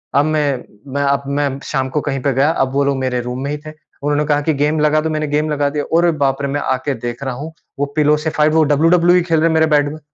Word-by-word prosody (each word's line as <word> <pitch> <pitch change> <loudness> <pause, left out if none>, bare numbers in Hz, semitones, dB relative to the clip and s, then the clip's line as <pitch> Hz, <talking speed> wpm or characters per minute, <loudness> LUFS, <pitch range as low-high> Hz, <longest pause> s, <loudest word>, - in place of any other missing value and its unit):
अब 140 +1 +4
मैं 150 -4 0 0.3
मैं 140 - 0
अब 140 0 +1
मैं 140 0 0 0.2
शाम 130 0 -2
को 150 +3 -1
कहीं 135 -2 -2
पे 140 +1 0
गया। 135 +4 +2
अब 135 -5 0
वो 140 - +2
लोग 140 -1 0
मेरे 130 -1 -1
रूम 125 +1 -5
में 140 - -3
ही 150 - -2
थे। - - -6 0.3
उन्होंने 145 +1 +1
कहा 145 -1 +1
कि 155 +2 0
गेम 150 +2 0
लगा 150 0 +3
दो 160 - -2
मैंने 155 -1 -2
गेम 150 +1 0
लगा 145 -1 +1
दिया। 145 0 -3
अरे 170 0 +4
बाप 135 0 0
रे! 140 - -1
मैं 145 +1 -2
आके 130 +2 -1
देख 120 +3 -6
रहा 130 - -3
हूँ। 150 +5 -7 0.3
वो 145 - +1
पिलो 150 0 +4
से 155 +1 -2
फ़ाइट 155 0 +2
वो 160 -1 +4
WWE 170 +4 +4
खेल 165 -2 +2
रहे 165 - +3
हैं 165 - +1
मेरे 160 - +4
बेड 145 0 +2
में। 155 - -9
145 Hz, 285 wpm, -17 LUFS, 140-155 Hz, 0.3 s, अब